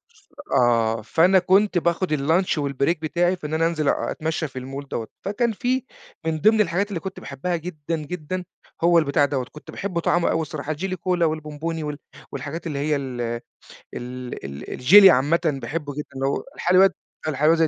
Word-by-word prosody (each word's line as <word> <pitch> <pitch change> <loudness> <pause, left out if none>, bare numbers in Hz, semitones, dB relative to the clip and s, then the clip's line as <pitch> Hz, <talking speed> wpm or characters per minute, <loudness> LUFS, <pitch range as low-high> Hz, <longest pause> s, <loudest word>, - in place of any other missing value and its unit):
ف 420 - -26 0.3
آه، 115 -2 +3
فأنا 180 - +4
كنت 190 +1 +3
باخد 170 -1 +1
الlunch 160 +4 +1
والbreak 140 +3 0
بتاعي 175 +3 +1
في 155 -4 -7
إن 155 - -6
أنا 165 +1 +2
أنزِل 155 -4 0
أ - - 0
أتمشّى 160 0 -2
في 130 -1 -7
الmall 135 +2 -7
دوّة، 115 -4 -4 0.2
فكان 225 +4 0
في 250 +4 -1 0.4
من 160 -1 -1
ضمن 215 0 +5
الحاجات 200 +1 0
اللي 185 -5 -3
كنت 190 +1 -7
باحبها 145 +6 -3
جدًا، 165 -1 -4
جدًا 180 +3 -5 0.4
هو 170 0 +6
البتاع 145 -1 +2
دوّة، 135 -3 -2
كنت 150 - -11
باحب 185 -4 -3
طعمه 170 +1 +2
أوي 160 - +1
الصراحة 155 0 -4
الJelly 185 +4 -3
Cola 180 -1 +1
والبومبوني 155 +1 -2
وال 150 -1 -4 0.3
والحاجات 160 +3 -5
اللي 140 -3 -3
هي 150 +1 +1
ال 130 -3 -4
ال 115 0 -2 1.0
ال 70 0 -7
الجيلي 195 +10 +8
عامةً 145 +5 +3
باحبه 145 0 -2
جدًا 150 +1 -5
اللي 135 +1 -1
هو - - -1
الحلويات 185 +2 +4 0.3
الحلاوة 150 +2 +3
اللي 160 -1 +3
160 Hz, 185 wpm, -23 LUFS, 145-180 Hz, 1.0 s, الجيلي